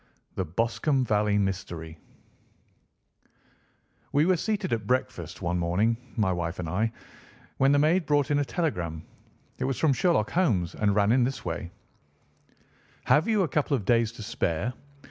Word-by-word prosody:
THE 95 - -2
BOSCOMBE 115 - 0
VALLEY 105 -2 +2
MYSTERY 85 -5 -3 2.1
We 145 +2 +3
were 185 +1 +4
seated 205 - -1
at 110 -3 -2
breakfast 90 -9 -2
one 90 +1 0
morning, 95 +7 +1 0.2
my 105 -6 +1
wife 85 -1 -3
and 90 - -4
I, 105 +7 0 0.7
when 135 +1 +4
the 145 - +4
maid 160 +4 +2
brought 145 -1 +2
in 145 - +3
a - - +2
telegram. 90 - -2 0.6
It - - -1
was 135 -1 -1
from 155 -4 +3
Sherlock 165 - +1
Holmes 110 - +1
and 100 -1 +1
ran 105 0 +3
in 125 +1 +4
this 130 +2 -3
way: 85 0 -4 1.3
"Have 150 - +3
you 215 -3 +3
a - - 0
couple 145 -1 +1
of 105 - -7
days 115 -1 +3
to 115 - -9
spare? 100 +1 -1
115 Hz, 160 wpm, -27 LUFS, 90-145 Hz, 2.1 s, were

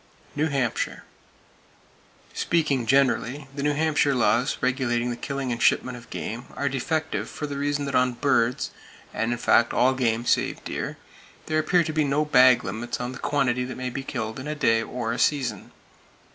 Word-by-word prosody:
New 150 +2 +1
Hampshire: 135 -6 -2 1.3
Speaking 145 -8 0
generally, 135 +1 +2
the 140 - -5
New 145 +1 +1
Hampshire 150 -2 +2
laws 120 +1 +2
regulating 125 -2 0
the - - -3
killing 135 +1 -4
and 120 - -3
shipment 125 -1 +2
of 120 -1 -12
game 120 +3 -5
are 140 - -1
defective 155 +4 -2
for 150 - -5
the 145 -1 -5
reason 145 0 -1
that 140 - -4
on 125 -1 +3
birds, 130 0 +1 0.4
and 115 - -1
in 120 - -1
fact 120 0 +3
all 130 +1 +4
game 120 -2 0
save - - 0
deer, - - -4 0.5
there 155 0 0
appear 170 +3 +3
to 155 -1 -4
be 155 0 +2
no 145 +2 +1
"bag" 130 -4 +6
limits 110 +5 -4
on 125 0 -3
the 125 - -9
quantity 130 -4 0
that 130 +1 -6
may 130 0 -3
be 135 - -4
killed 115 -4 -4
in 130 - -7
a 150 - -3
day 115 -6 +3
or 115 0 -3
a - - -4
season. 140 -5 0
130 Hz, 185 wpm, -25 LUFS, 120-145 Hz, 1.3 s, bag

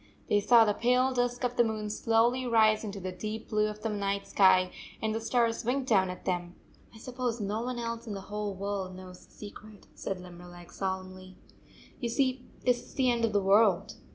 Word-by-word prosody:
They 205 - +4
saw 230 +2 +6
the 210 - +2
pale 250 +4 +2
disk 245 0 -1
of 245 0 -1
the 240 - +6
moon 215 -2 -3
slowly 235 +4 +2
rise 220 -2 +4
into 205 -2 -5
the 185 0 -4
deep 215 +4 -6
blue 215 0 +2
of 210 0 -7
the 225 - -1
night 200 -1 -2
sky, 185 -2 +4 0.3
and 220 0 -1
the 225 - -2
stars 230 0 +1
wink 255 +3 0
down 190 -5 +3
at 180 - -8
them. 175 -1 -2 0.2
" - - -25
I - - -11
suppose 245 0 -3
no 210 +2 -2
one 250 +1 -3
else 230 0 -4
in 210 - -4
the 195 - -6
whole 205 0 -4
world 195 -1 -4
knows 185 -1 -12
the - - -28
secret," 210 0 -12
said 190 - -4
Limberleg 175 -1 -12
solemnly. 185 -1 -5 0.6
"You 240 - -2
see 255 +1 0 0.2
this 245 -1 +3
is - - -17
the 255 -2 +3
end 235 -1 +1
of 225 - -1
the 205 -1 +1
world. 200 -1 +4
215 Hz, 210 wpm, -29 LUFS, 195-235 Hz, 0.6 s, saw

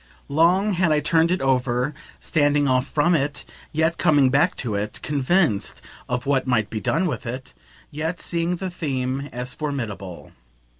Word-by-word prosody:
Long 175 +8 +3
had 180 -3 +2
I 150 - +4
turned 165 +2 +2
it 185 - 0
over, 125 +1 +1 0.3
standing 145 -2 +2
off 130 0 +2
from 155 +4 +2
it, 145 -2 -1 0.3
yet 160 +2 +1
coming 145 -4 +4
back 145 +6 +3
to 115 -4 -3
it; 105 +1 -3
convinced 145 - +1 0.3
of 125 +1 -2
what 140 -1 +1
might 110 -4 +1
be 110 - -3
done 165 - +1
with 150 -6 -3
it, 125 +2 -6 0.4
yet 160 +4 -3
seeing 170 +1 -1
the 185 +1 -4
theme 135 -4 -3
as 125 +1 -4
formidable. 115 - -5
145 Hz, 160 wpm, -23 LUFS, 125-165 Hz, 0.4 s, I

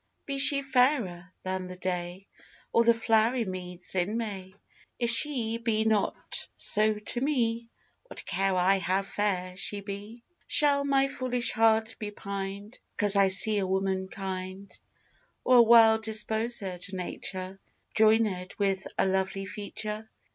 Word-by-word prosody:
Be 275 -1 -3
she 280 0 +6
fairer 250 -10 0
than 185 0 -4
the 180 - -8
day, 180 +1 -5 0.5
Or 230 - +4
the 235 - +5
flowery 225 +1 +1
meads 180 -1 -7
in 190 +4 -1
May, 195 -4 -6 0.4
If 235 -1 0
she 230 -3 +3
be 220 -2 -1
not 215 -2 -1
so 215 +1 +2
to 210 +3 -3
me, 235 -5 -1 0.4
What - - -8
care 195 0 -1
I 190 +2 +2
how 185 +2 -1
fair 190 -3 -2
she 200 +1 -3
be? 205 +4 -9 0.2
Shall 285 -1 +5
my 275 -1 +2
foolish 250 -2 0
heart 225 0 +2
be 210 - -5
pined 200 +1 -7 0.2
'Cause 205 -1 +4
I 200 -1 +4
see 205 +2 +4
a 190 - -2
woman 190 0 -1
kind; 190 0 -7 0.7
Or 255 - +4
a - - +9
well 225 -1 +6
disposèd 220 -3 -2
nature 185 0 -5 0.4
Joinèd 215 -4 +1
with 195 -2 -1
a - - +2
lovely 190 +1 -1
feature? 210 +2 -6
205 Hz, 140 wpm, -27 LUFS, 190-230 Hz, 0.7 s, a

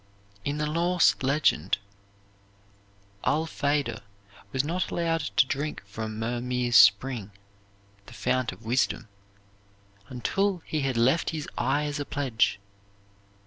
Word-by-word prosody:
In 145 +1 -2
the 150 - 0
Norse 170 +3 +3
legend, 135 - +2 1.5
Allfader 145 -6 0 0.5
was 130 0 +1
not 175 +5 -2
allowed 165 -1 0 0.2
to 155 - +7
drink 145 0 -3
from 110 +2 -6
Mirmir's 120 +1 -1
Spring, 105 +1 +5 0.8
the - - -12
fount 130 -2 0
of 115 - -14
wisdom, 120 -1 0 1.0
until 180 - -1
he 155 - -2
had 135 -3 -1
left 130 +8 +3
his 155 -2 -4
eye 135 +4 +1
as 145 0 -3
a 145 - -3
pledge. 125 -9 0
135 Hz, 115 wpm, -27 LUFS, 120-155 Hz, 1.5 s, to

